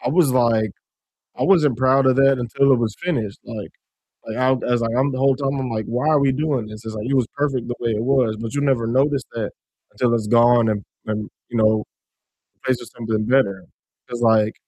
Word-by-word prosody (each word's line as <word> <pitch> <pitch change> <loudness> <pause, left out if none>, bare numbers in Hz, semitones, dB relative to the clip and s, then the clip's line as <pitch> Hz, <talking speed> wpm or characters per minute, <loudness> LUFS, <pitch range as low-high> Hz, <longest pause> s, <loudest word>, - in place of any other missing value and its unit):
I - - -3
was 150 -2 +3
like 115 -4 +2 0.7
I - - -1
wasn't 150 -10 +3
proud 130 +1 +3
of 130 - +4
that 135 0 +4
until 135 +3 +2
it 130 - +5
was 110 -3 -2
finished, 115 - -2
like 110 -4 -7 0.6
like 110 - -5
I 130 +1 +2
I - - +5
was 120 -1 -1
like, 115 +1 -1
I'm 135 +2 +2
the 130 - -4
whole 135 0 +3
time 135 0 -2
I'm 130 - -3
like, 110 -2 -3
"Why 125 +6 -2
are 150 - +4
we 140 -1 +3
doing 135 -5 -1
this?" 110 +1 -11
It's, 110 0 -6
like, 105 +2 -5
it 140 - +1
was 125 -4 +2
perfect 140 -4 -1
the 120 - -4
way 115 -1 -1
it 105 - -1
was, 125 -5 +1
but 115 +3 -5
you 145 - 0
never 130 -5 +1
notice 135 +3 +1
that 110 -3 -3 0.4
until 120 -2 0
it's 110 -2 -2
gone 120 0 +4
and 105 -2 -2 0.2
and, 105 -1 -3 0.2
you 120 - -3
know, 110 -1 +3 0.7
replaced 130 -2 -2
with 120 - -12
something 110 -2 -2
better 115 -7 +1 0.4
'cause 120 0 -6
like 110 -2 +3
120 Hz, 230 wpm, -21 LUFS, 110-135 Hz, 0.7 s, it